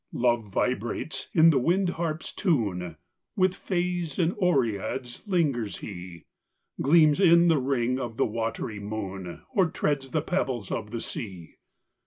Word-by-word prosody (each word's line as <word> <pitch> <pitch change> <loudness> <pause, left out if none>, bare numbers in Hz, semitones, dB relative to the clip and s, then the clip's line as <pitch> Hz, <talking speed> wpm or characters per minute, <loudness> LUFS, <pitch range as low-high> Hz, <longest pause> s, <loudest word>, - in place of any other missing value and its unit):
Love 120 -2 +1
vibrates 120 +7 -2
in 165 0 +6
the 140 - +3
wind 180 +7 +2
harp 165 -2 -3
s - - -7
tune 100 - 0 0.4
With 185 -3 +3
fays 175 -4 -2
and 175 0 +2
oreads 125 - 0
lingers 140 - 0
he 90 -4 -9 0.6
Gleams 155 +1 +5
in 170 -2 +6
th 160 -3 +4
ring 125 -1 0
of 120 -3 -5
the - - +3
watery 115 -1 -3
moon, 100 -4 -6
Or 190 -7 +4
treads 145 -4 -1
the 155 +2 -1
pebbles 130 - -2
of 110 -2 -3
the 115 +1 -4
sea. 95 - -7
130 Hz, 145 wpm, -27 LUFS, 110-170 Hz, 0.6 s, in